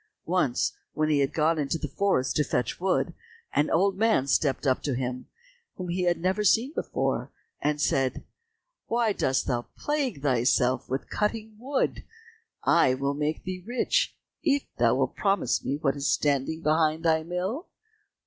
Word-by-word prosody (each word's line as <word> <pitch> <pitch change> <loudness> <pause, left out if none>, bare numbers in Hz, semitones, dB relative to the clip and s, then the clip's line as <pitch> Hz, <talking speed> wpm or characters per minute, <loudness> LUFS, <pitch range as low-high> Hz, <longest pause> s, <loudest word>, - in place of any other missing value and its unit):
Once 160 -8 +1 0.2
when 155 0 0
he 150 -2 +3
had 135 -1 +1
gone 160 +1 +2
into 145 +2 0
the - - -4
forest 190 -10 0
to 150 - +3
fetch 125 -4 -2
wood, 185 +1 +1 0.4
an 150 - +2
old 195 +3 +2
man 220 - +2
stepped 140 0 +1
up 130 -2 +2
to 140 -4 -1
him 125 0 -3 0.5
whom 180 -1 -6
he 180 +1 0
had 175 -1 +2
never 190 +4 0
seen 230 +8 +3
before, - - -2 0.3
and 150 0 0
said, 135 -2 +1 0.6
"Why 230 -2 +1
dost 130 -7 0
thou 120 -2 -2
plague 280 - -2
thyself 125 -1 +2
with 130 +2 -3
cutting 215 +1 -2
wood, 265 +3 -1 0.6
I 130 - +4
will 140 +1 -1
make 150 +2 -2
thee 185 -1 -5
rich, 240 +5 0 0.3
if 285 -3 +2 0.2
thou - - +4
wilt - - 0
promise 195 - +1
me 140 - -1
what 140 -2 0
is 140 0 -2
standing 145 +3 0
behind 155 +1 +2
thy 160 -1 +4
mill?" 180 - -3
160 Hz, 165 wpm, -27 LUFS, 135-195 Hz, 0.6 s, I